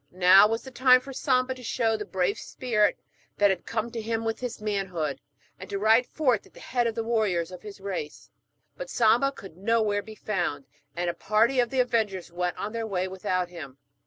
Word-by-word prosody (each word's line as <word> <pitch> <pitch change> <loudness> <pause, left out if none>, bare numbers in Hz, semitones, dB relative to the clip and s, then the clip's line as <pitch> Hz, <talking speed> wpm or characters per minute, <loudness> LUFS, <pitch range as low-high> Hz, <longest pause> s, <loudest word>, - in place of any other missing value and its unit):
Now 185 +3 +7
was 225 +1 -2
the 265 - -10
time 255 0 +6
for 270 +2 -10
Samba 255 -1 +1
to 255 - -13
show 225 -1 0
the 210 -1 -4
brave 190 0 -1
spirit 215 -5 0 0.4
that 205 -1 +5
had 190 - -4
come 230 +1 -2
to 230 -1 -4
him 225 +1 -2
with 225 0 -2
his 250 -2 -5
manhood, 190 -8 -2 0.4
and 185 - -9
to 200 - -2
ride 220 +4 +4
forth 255 -9 0
at - - -25
the - - -12
head 245 -2 0
of 225 - -3
the 230 - -2
warriors 210 -7 0
of 180 - -9
his 205 -1 -10
race. 190 -6 -6 0.4
But - - -7
Samba 235 +4 +3
could 195 - -12
nowhere 210 0 +1
be 220 +1 -11
found, 175 -10 -2 0.3
and 175 +1 -2
a 170 - 0
party 220 +8 +2
of 240 -1 +2
the 260 0 +2
avengers 220 -8 -1
went 180 +1 -2
on 210 +2 -4
their 230 -1 -3
way 185 -2 -1
without 185 -1 -2
him. 150 -7 -9
215 Hz, 215 wpm, -27 LUFS, 185-235 Hz, 0.4 s, Now